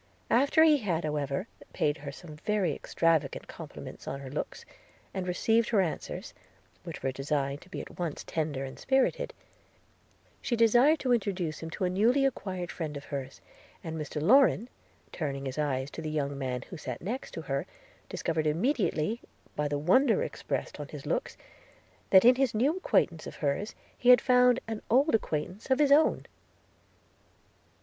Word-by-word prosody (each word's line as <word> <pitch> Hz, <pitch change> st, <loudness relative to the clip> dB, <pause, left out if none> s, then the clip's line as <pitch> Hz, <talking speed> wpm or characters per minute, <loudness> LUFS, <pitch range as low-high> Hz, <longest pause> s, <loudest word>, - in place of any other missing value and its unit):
After 280 Hz, +6 st, +5 dB
he 310 Hz, -2 st, +6 dB
had 180 Hz, -, -1 dB
however 150 Hz, +4 st, -2 dB, 0.3 s
paid 145 Hz, +1 st, +1 dB
her 145 Hz, -1 st, -7 dB
some 155 Hz, +1 st, -11 dB
very 200 Hz, -2 st, 0 dB
extravagant 165 Hz, +1 st, 0 dB
compliments -, -, -10 dB
on 135 Hz, -, -4 dB
her 135 Hz, -2 st, -8 dB
looks, 145 Hz, -, -5 dB, 0.5 s
and 185 Hz, -2 st, -3 dB
received 225 Hz, +6 st, +2 dB
her 220 Hz, -, +3 dB
answers, 180 Hz, -4 st, -3 dB, 0.5 s
which -, -, -8 dB
were 135 Hz, -, 0 dB
designed 140 Hz, +1 st, -2 dB
to 185 Hz, -, -17 dB
be -, -, -5 dB
at -, -, -12 dB
once 170 Hz, -4 st, -3 dB
tender 150 Hz, -4 st, -2 dB
and 130 Hz, -, -9 dB
spirited, 270 Hz, -, +1 dB, 1.1 s
she 240 Hz, -, 0 dB
desired 240 Hz, +7 st, +5 dB
to 255 Hz, -2 st, +2 dB
introduce 190 Hz, -8 st, -1 dB
him 165 Hz, -, -6 dB
to 185 Hz, -, -5 dB
a 180 Hz, -, +2 dB
newly 240 Hz, +9 st, +3 dB
acquired 185 Hz, -9 st, -3 dB
friend 155 Hz, -4 st, -4 dB
of 140 Hz, -, -8 dB
hers; 135 Hz, -2 st, -6 dB, 0.4 s
and 160 Hz, -1 st, -5 dB
Mr 150 Hz, -1 st, -4 dB
Lorrain, 240 Hz, -, +4 dB, 0.4 s
turning 140 Hz, -4 st, -3 dB
his 130 Hz, +2 st, -4 dB
eyes 135 Hz, -2 st, -1 dB
to -, -, -7 dB
the 155 Hz, -, -4 dB
young 145 Hz, -2 st, -2 dB
man 130 Hz, -2 st, -3 dB
who 180 Hz, -, -6 dB
sat 125 Hz, -5 st, -5 dB
next 240 Hz, +8 st, -4 dB
her, 140 Hz, -4 st, -3 dB, 0.4 s
discovered 160 Hz, -2 st, -1 dB
immediately, 210 Hz, -, 0 dB, 0.3 s
by 150 Hz, 0 st, 0 dB
the 145 Hz, 0 st, -1 dB
wonder 225 Hz, -, +3 dB
expressed -, -, -4 dB
in -, -, -5 dB
his -, -, -9 dB
looks, -, -, -2 dB, 0.7 s
that 190 Hz, +2 st, +7 dB
in 250 Hz, -, +9 dB
this 255 Hz, -3 st, 0 dB
new 270 Hz, +9 st, +2 dB
acquaintance 170 Hz, -, +1 dB
of -, -, -8 dB
hers, 150 Hz, +9 st, -2 dB, 0.2 s
he 245 Hz, -, +1 dB
had 250 Hz, -1 st, +9 dB
found 250 Hz, -1 st, +4 dB
an 225 Hz, -1 st, -4 dB
old 270 Hz, +6 st, +4 dB
acquaintance 185 Hz, -, -2 dB
of 260 Hz, -, +4 dB
his 290 Hz, -1 st, +3 dB
own. 300 Hz, +3 st, +4 dB
180 Hz, 170 wpm, -29 LUFS, 150-240 Hz, 1.1 s, in